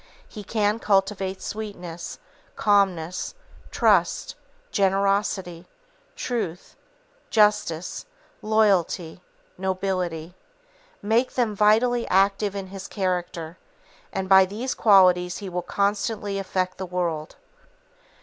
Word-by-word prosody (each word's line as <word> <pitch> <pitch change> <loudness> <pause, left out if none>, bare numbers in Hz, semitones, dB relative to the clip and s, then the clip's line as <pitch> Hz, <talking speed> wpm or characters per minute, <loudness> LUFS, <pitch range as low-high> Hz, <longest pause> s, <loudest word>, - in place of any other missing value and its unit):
He 210 - -9
can 210 +1 0
cultivate 195 -2 0
sweetness, 180 -6 -6 0.4
calmness, 190 - +1 0.3
trust, - - +2 0.4
generosity, 195 -3 0 0.5
truth, 205 -9 -4 0.5
justice, 210 -6 +1 0.3
loyalty, 195 -6 +1 0.4
nobility, 185 -3 -2 0.7
make 225 +5 +1
them 230 -4 0
vitally 230 +4 +3
active 195 +1 +2
in 195 -1 -4
his 195 -1 -7
character, 180 -3 -3 0.5
and 190 0 -3
by 190 0 +7
these 220 +7 -4
qualities 180 -4 +4
he 200 -2 -6
will 180 0 -3
constantly 200 +1 -1
affect 185 -1 -2
the 190 - -4
world. 170 -3 -3
195 Hz, 90 wpm, -24 LUFS, 180-210 Hz, 0.7 s, by